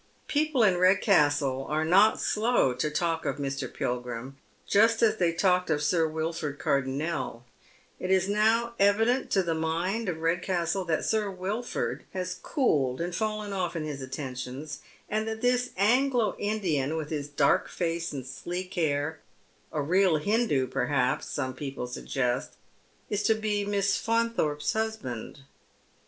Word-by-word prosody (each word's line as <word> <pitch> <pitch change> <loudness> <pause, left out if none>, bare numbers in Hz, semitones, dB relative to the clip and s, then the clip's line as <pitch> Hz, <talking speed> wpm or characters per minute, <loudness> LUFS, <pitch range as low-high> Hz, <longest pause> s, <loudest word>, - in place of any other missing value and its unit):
People 295 -4 +2
in 185 -4 +4
Redcastle 150 - +3
are 155 +1 0
not 195 +6 +5
slow 215 - +2
to 125 +5 -1
talk 165 +1 -1
of - - -2
Mr. 135 -2 -3
Pilgrim 125 +1 -4 0.3
just 225 +3 +4
as 220 -1 +4
they 175 -4 +2
talked 180 +1 +2
of 150 -2 +1
Sir 165 +1 +2
Wilford 160 -2 -3
Cardonnel. 140 -2 -1 0.6
It 185 - -4
is 190 0 +3
now 220 +3 +2
evident 225 +6 +3
to 195 - +2
the 170 -2 0
mind 170 +7 -1
of 170 - -2
Redcastle 175 +2 0
that 160 -2 0
Sir 215 -2 +1
Wilford 195 +6 -3
has 180 -1 -4
cooled 140 - +1
and 175 +1 -3
fallen 215 -1 -2
ofE 185 -3 -2
in 160 - -2
his 145 -3 -5
attentions, 130 +2 -6 0.3
and 215 +1 -1
that 220 0 -4
this 250 0 +2
Anglo 245 +3 +3
Indian, 165 -9 0
with 155 -1 -5
his 145 -2 -2
dark 145 - +2
face 170 -1 -2
and 135 -3 -5
sleek 175 +8 -5
hair 155 -2 0 0.3
— - - -36
a 150 - -1
real 180 +1 +3
Hindoo, 200 - +1
perhaps, 130 -1 0
some 130 -2 -3
people 135 -1 -5
suggest 125 0 -2 0.3
— - - -36
is 205 0 0
to 220 +2 +3
be 210 -2 -1
Miss 200 -1 +1
Faunthorpe's 230 -11 0
husband. 220 - -4
175 Hz, 150 wpm, -28 LUFS, 145-210 Hz, 0.6 s, not